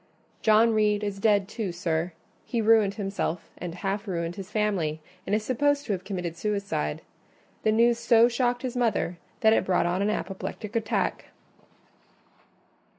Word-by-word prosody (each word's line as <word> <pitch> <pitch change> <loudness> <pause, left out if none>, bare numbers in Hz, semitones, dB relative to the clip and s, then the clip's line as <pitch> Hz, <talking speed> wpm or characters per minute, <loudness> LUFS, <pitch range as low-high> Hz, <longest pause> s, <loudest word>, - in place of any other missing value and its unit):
"John 220 +1 +5
Reed 210 -1 +2
is 200 -1 -3
dead, 205 -2 +3
too, 215 -3 -3
sir: 170 0 -2 0.3
he 235 - -2
ruined 215 -3 +4
himself 195 -5 -3
and 175 -1 -5
half 200 +3 -3
ruined 170 -2 -2
his 195 -1 -8
family, 200 -8 0 0.3
and 205 - +2
is 215 - -1
supposed 285 +4 +1
to - - -3
have 185 -2 -4
committed 180 -4 -4
suicide. 200 - -2 0.6
The 215 - +2
news 235 +2 +3
so 235 0 +5
shocked 245 0 0
his 255 -1 -3
mother 215 -8 0 0.2
that 220 0 +6
it - - +3
brought 185 -2 +2
on 175 +2 0
an 205 - +1
apoplectic 210 +1 -4
attack." 225 0 -1
210 Hz, 155 wpm, -27 LUFS, 185-225 Hz, 0.6 s, that